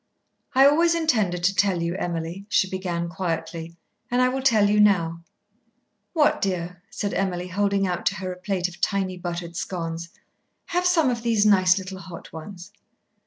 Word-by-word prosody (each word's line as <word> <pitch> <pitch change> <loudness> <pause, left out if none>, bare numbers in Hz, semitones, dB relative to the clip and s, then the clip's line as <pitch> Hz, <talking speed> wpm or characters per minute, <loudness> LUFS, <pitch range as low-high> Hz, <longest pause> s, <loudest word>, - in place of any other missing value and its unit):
"I 265 +1 +7
always 335 +4 +4
intended 215 - +1
to 190 +2 +3
tell 190 -4 +2
you, 170 0 -1
Emily," 175 +1 -4
she 190 - +3
began 180 -3 -3
quietly, 165 -1 -4 0.3
"and 245 - +1
I 255 0 +4
will 265 +1 -2
tell 220 -6 +4
you 210 +1 +3
now." 170 -5 +3 0.9
"What, 305 -4 +3
dear?" 180 -2 -2
said 210 -4 -3
Emily, 180 -2 -2
holding 200 +1 +1
out 180 -2 -2
to - - +1
her 185 0 -4
a 180 - -14
plate 185 -1 -1
of 180 0 -13
tiny 195 -2 0
buttered 175 -1 -5
scones. 170 -2 -4 0.6
"Have 355 +1 0
some 325 -7 +3
of 235 -1 -3
these 225 -3 +2
nice, 185 -3 +5
little 190 0 -6
hot 170 -1 -10
ones." 175 +2 -9
185 Hz, 170 wpm, -24 LUFS, 175-210 Hz, 0.9 s, I